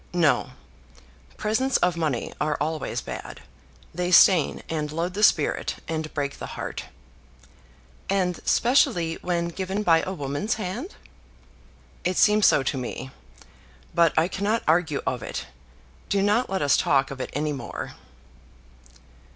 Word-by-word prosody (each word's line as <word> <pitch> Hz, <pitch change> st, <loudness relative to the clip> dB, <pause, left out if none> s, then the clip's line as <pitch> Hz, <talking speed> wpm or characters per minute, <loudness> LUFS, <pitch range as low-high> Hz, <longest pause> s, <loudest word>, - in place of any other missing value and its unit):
"No; 170 Hz, -4 st, +2 dB, 0.8 s
presents 255 Hz, +5 st, +1 dB
of 180 Hz, -1 st, +1 dB
money 155 Hz, -7 st, -2 dB
are 150 Hz, -1 st, 0 dB
always 155 Hz, +1 st, -2 dB
bad. -, -, -8 dB, 0.5 s
They 175 Hz, +1 st, -2 dB
stain 180 Hz, -3 st, +5 dB
and 150 Hz, -2 st, -3 dB
load 170 Hz, +3 st, -2 dB
the 205 Hz, -, -3 dB
spirit, 210 Hz, -, +2 dB
and 160 Hz, -1 st, -3 dB
break 140 Hz, -1 st, -3 dB
the -, -, -5 dB
heart." -, -, -5 dB, 1.2 s
"And 185 Hz, -3 st, 0 dB
specially 230 Hz, -, +2 dB
when 170 Hz, -1 st, -1 dB
given 190 Hz, +4 st, -3 dB
by 165 Hz, -4 st, +4 dB
a 190 Hz, -, -4 dB
woman's 145 Hz, +5 st, -2 dB
hand?" 220 Hz, -, -5 dB, 1.1 s
"It 180 Hz, 0 st, -1 dB
seems 210 Hz, 0 st, +5 dB
so 140 Hz, -, +4 dB
to 135 Hz, -, -1 dB
me. 130 Hz, +1 st, -6 dB, 0.8 s
But 170 Hz, -1 st, +3 dB
I 160 Hz, +2 st, +4 dB
cannot 205 Hz, +4 st, -1 dB
argue 160 Hz, -2 st, +2 dB
of 125 Hz, -2 st, -1 dB
it. -, -, -5 dB, 0.6 s
Do 200 Hz, -1 st, +2 dB
not 210 Hz, +5 st, +2 dB
let 190 Hz, -4 st, -1 dB
us 140 Hz, -1 st, +4 dB
talk 135 Hz, -1 st, +2 dB
of 135 Hz, -1 st, -6 dB
it -, -, -4 dB
any 150 Hz, +1 st, -1 dB
more." 135 Hz, -4 st, -6 dB
170 Hz, 140 wpm, -25 LUFS, 150-195 Hz, 1.2 s, stain